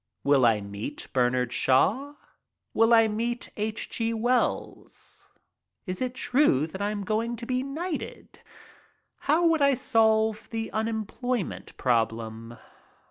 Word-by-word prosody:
Will 140 -3 +4
I 110 -2 +2
meet 100 +1 -5
Bernard 125 -1 +1
Shaw? 255 - +2 0.6
Will 225 +1 +3
I 225 -1 +6
meet 235 +3 -3
H. 215 +1 -3
G. 230 0 -2
Wells? 240 +3 -2 0.5
Is 185 +2 -5
it 255 -1 -2
true 250 - +2
that 190 +5 -8
I 205 - 0
am 210 -1 -3
going 225 +4 -1
to 235 +1 -8
be 255 +1 -1
knighted? 305 +5 -6 0.9
How 325 +4 +4
would 325 -2 +3
I 280 -1 +4
solve 220 -4 +2
the 225 -1 -4
unemployment 220 +1 -3
problem? 115 -1 -1
220 Hz, 130 wpm, -27 LUFS, -, 0.9 s, I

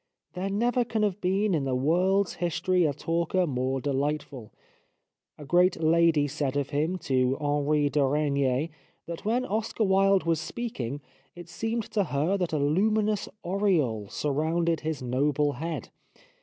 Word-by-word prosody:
There 190 +2 -3
never 240 +5 +1
can 220 -2 -1
have 205 -1 -1
been 195 +2 +1
in 155 -4 +1
the 130 -1 0
world's 180 +8 +2
history 175 +1 +1
a 150 - +2
talker 170 +5 0
more 130 -2 -1
delightful. 140 -3 -3 0.9
A 150 - -10
great 180 +4 +3
lady 160 -2 +3
said 145 -1 -2
of 140 0 -2
him 155 +5 0
to 130 0 +2
Henri 145 0 +1
de 145 0 +1
Regnier 140 0 +1 0.4
that 170 +2 -7
when 240 +4 +1
Oscar 220 0 -1
Wilde 195 -1 +3
was 165 -2 0
speaking 145 - -5 0.3
it 175 -1 -11
seemed 225 +6 -2
to 205 -3 +1
her 150 +5 0
that 180 -3 -1
a 155 - 0
luminous 210 +8 +1
aureole 170 - 0
surrounded 160 +3 0
his 155 -4 -4
noble 145 +4 +1
head. 160 +5 -5
160 Hz, 150 wpm, -27 LUFS, 145-190 Hz, 0.9 s, great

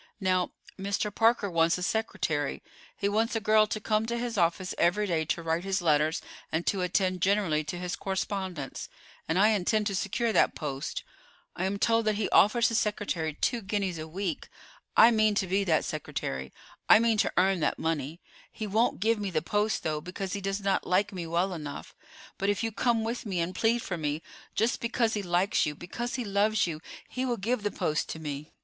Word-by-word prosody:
Now, 185 -2 +1 0.3
Mr. 200 +1 -1
Parker 225 -1 +3
wants 165 -1 +2
a 180 - -4
secretary. 160 -9 -1 0.3
He 200 - 0
wants 220 +3 +1
a - - +2
girl 215 0 +4
to 215 - -3
come 215 +1 0
to 235 +1 -1
his 235 -1 -3
office 180 0 +1
every 185 +5 +3
day 165 -5 0
to 170 +2 -2
write 165 +1 0
his 195 0 0
letters 155 -2 +2 0.3
and 165 +2 -1
to 195 - +1
attend 185 0 0
generally 190 -6 +2
to 165 +4 -4
his 180 0 -3
correspondence, 190 -6 -4 0.4
and 160 - +1
I 210 +3 +6
intend 215 +1 +1
to 200 -2 -1
secure 220 +4 0
that - - +3
post. 140 -3 -4 0.5
I 185 - -1
am 195 +1 -1
told 230 +1 +2
that 215 -1 +2
he 210 -1 0
offers 230 +4 +5
his 230 - +2
secretary 180 -7 -2
two 240 +6 0
guineas 195 -4 -2
a 155 - -6
week. 180 +1 -4 0.5
I 230 +2 +9
mean 215 -2 +3
to 195 - +1
be 195 +2 +1
that 160 -4 +2
secretary: 65 - -4 0.4
I - - +10
mean 225 -1 +2
to - - +2
earn 190 0 +3
that 150 - 0
money. 160 0 -2 0.3
He 220 - -5
won't 215 0 +1
give 225 +1 +2
me 205 -1 -2
the 155 -4 -1
post, 210 +4 0
though, 155 -1 -1
because 185 +3 -5
he 200 - -3
does 195 +1 -2
not 195 -1 0
like 195 +3 +2
me 175 -3 -5
well 175 +3 0
enough; 150 -4 -7 0.5
but 195 - +1
if 205 +2 0
you 225 - -1
come 225 +2 +1
with 230 +2 -3
me 190 -5 -2
and 170 +2 -1
plead 230 +3 +1
for 175 -3 -4
me, 150 +1 -2 0.3
just 225 +2 +1
because 235 -1 +1
he 210 - -1
likes 180 -1 +1
you, 150 - -3
because 235 +9 -5
he 250 -3 -3
loves 205 +2 +2
you, 160 -3 -4 0.3
he 255 - -3
will 245 -2 0
give 225 +3 -1
the 205 - 0
post 155 -5 -1
to - - -4
me. 150 -1 -6
195 Hz, 210 wpm, -28 LUFS, 170-215 Hz, 0.5 s, I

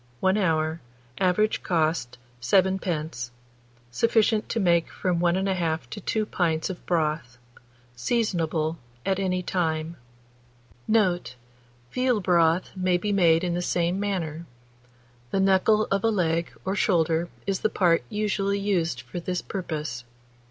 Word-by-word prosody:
1 190 +6 +2
hour. 160 -4 0 0.4
Average 195 +4 +2
cost, 160 -7 0 0.2
7d. 165 -4 0 0.6
Sufficient 220 - +2
to 230 - -1
make 170 -4 +3
from 180 -2 -1
1 175 0 +2
1/2 180 -4 -1
to 205 - -6
2 215 +3 -1
pints 170 -3 0
of 180 - -9
broth. 155 -7 -1 0.6
Seasonable 165 - 0 0.3
at 195 0 +1
any 185 -1 0
time. 165 -2 -1 0.9
Note. 185 - +1 0.6
Veal 255 -3 +1
broth 175 -2 +2
may 185 -1 +2
be 205 +4 -2
made 170 -4 +4
in 175 -1 0
the 175 - -1
same 175 +1 0
manner; 170 -5 -3 0.8
the 195 - 0
knuckle 195 +3 +3
of 195 0 +1
a 225 - +4
leg 170 -5 0
or 190 +1 -1
shoulder 170 -3 +2 0.2
is 195 -1 -1
the 215 - +1
part 170 -5 +3
usually 200 -1 0
used 170 -10 0
for 120 +8 -7
this 180 +1 -3
purpose. 155 - -4
175 Hz, 130 wpm, -26 LUFS, 160-195 Hz, 0.9 s, made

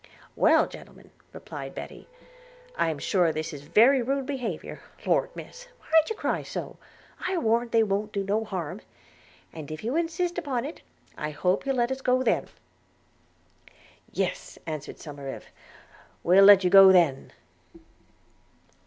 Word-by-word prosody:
'Well, - - +4
gentlemen,' - - -14 0.2
replied - - -9
Betty, - - -9 0.7
'I 165 - +1
am 155 - -3
sure 175 +2 +1
this 155 +1 -4
is 145 - -8
very 230 - +4
rude 270 +2 -1
behaviour 250 - -5 0.2
(Lord, - - +2
Miss, - - -11
why - - -20 0.2
d'ye 445 - -3
cry - - -2
so? - - -7 0.5
I 370 0 -1
warrant 235 -4 +1
they 230 -1 +4
won't 210 +1 -2
do 200 -2 -2
no 205 +3 0
harm); 185 -2 -5 0.7
and 155 -3 -9
if 155 +3 -7
you 240 +6 -2
insist 340 +1 -1
upon 270 -7 -3
it, 310 - -8 0.4
I 150 - -3
hope 180 - -1
you'll 270 - +1
let 240 0 0
us 265 0 -4
go 255 0 +2
then.' - - +1 1.6
'Yes,' - - -3
answered 155 -2 -6
Somerive, 140 -3 -8 0.8
'we'll 190 +3 +6
let 200 -1 +8
you 180 - +1
go 195 -1 +9
then.' 165 -8 +2
210 Hz, 145 wpm, -26 LUFS, 165-265 Hz, 1.6 s, go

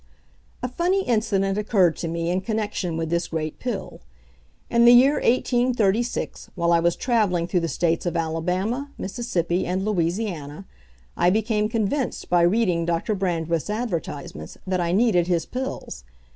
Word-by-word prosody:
A - - +1
funny 355 +9 0
incident 210 - +1
occurred 195 -6 +3
to 170 - -3
me 170 +1 -2
in 185 +1 0
connection 205 -5 -2
with 165 -1 -3
this 170 0 0
great 155 -2 -4
pill. 235 - -5 0.7
In 235 0 +3
the 240 - +9
year 265 +4 +6
1836, 240 -2 +1
while 170 -1 +2
I 170 - +5
was 170 +1 +2
travelling 210 -9 +1
through 180 +1 +1
the 165 - -1
States 165 +1 0
of 170 - -1
Alabama, 180 - -1
Mississippi, 185 -5 -1
and 185 +2 -1
Louisiana, 175 -4 -2 0.5
I 175 - +3
became 215 +1 +1
convinced 230 +4 -2
by 175 -1 +5
reading 180 -1 +2
Doctor 170 +5 -1
Brandreth's 170 -3 -1
advertisements 170 - -4
that 185 -1 0
I 170 0 0
needed 190 -4 +3
his 170 -3 +1
pills. 255 - -5
190 Hz, 150 wpm, -24 LUFS, 170-225 Hz, 0.7 s, the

